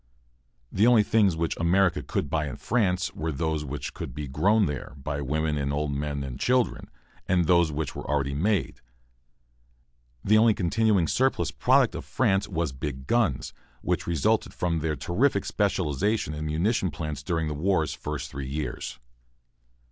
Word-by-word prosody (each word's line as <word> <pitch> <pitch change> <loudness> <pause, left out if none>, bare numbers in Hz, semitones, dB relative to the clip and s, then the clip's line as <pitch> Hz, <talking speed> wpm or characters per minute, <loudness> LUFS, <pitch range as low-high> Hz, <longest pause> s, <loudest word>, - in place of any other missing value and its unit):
The 105 +5 +3
only 120 -3 +6
things 100 -4 +3
which 80 0 -1
America 90 +2 +2
could - - -2
buy 75 +1 -1
in - - -6
France 95 -6 0
were 80 +1 -3
those 80 +1 -1
which 75 0 -5
could - - -7
be 75 -1 -4
grown 100 +11 +3
there, 75 -3 -5
by 70 +1 -4
women 75 +2 -1
and 70 0 -1
old 75 0 -1
men 70 0 -2
and 65 -1 -6
children, 125 -1 +1 0.4
and 90 -2 +2
those 85 -1 +4
which 75 0 -3
were - - -7
already 70 -2 0
made. 95 +8 0 1.4
The 110 +2 +5
only 110 -1 +5
continuing 100 -1 +2
surplus 130 +8 +1
product - - +3
of - - -5
France 95 +1 +1
was 85 -5 -2
big 65 0 -5
guns, 105 - 0 0.3
which - - -1
resulted 85 -5 +1
from 85 -2 0
their 80 0 -1
terrific 100 - +1
specialization 100 -2 0
in 75 0 -4
munition 95 +6 +1
plants 75 -1 -5
during 80 0 -1
the 75 - -2
war's 80 +1 0
first - - -5
three 70 -1 -5
years. 70 -4 -4
80 Hz, 165 wpm, -26 LUFS, 75-95 Hz, 1.4 s, only